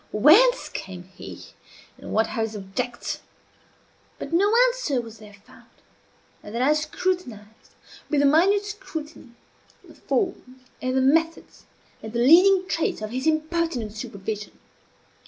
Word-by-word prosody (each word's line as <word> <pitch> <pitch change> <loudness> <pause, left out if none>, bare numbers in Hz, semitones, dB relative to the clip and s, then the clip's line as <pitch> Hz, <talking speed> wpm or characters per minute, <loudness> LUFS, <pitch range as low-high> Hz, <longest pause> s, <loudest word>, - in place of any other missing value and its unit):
whence 385 - +5
came 185 -2 -8
he? 190 +1 -11 0.5
and - - -9
what 220 +1 +1
are 225 - -3
his 220 -1 -3
objects?" 225 +5 -5 1.0
But - - -7
no 400 +5 +3 0.2
answer 485 - -1
was 225 -2 -9
there 210 -1 -14
found. - - -19 0.7
And 205 - -10
now 255 +4 +2
I - - +5
scrutinized, 305 - -4 0.3
with 290 -3 +2
a - - +4
minute 375 +8 +4
scrutiny, 320 - -8 0.5
the - - -15
forms, 260 - -3 0.2
and 255 +1 -1
the - - +3
methods, 325 +5 0 0.4
and 220 0 -8
the 235 - -1
leading 370 +5 +6
traits 325 -10 -2
of 215 - -5
his 260 +5 -3
impertinent 315 -7 -1
supervision. 210 -1 -6
265 Hz, 140 wpm, -24 LUFS, 220-335 Hz, 1.0 s, leading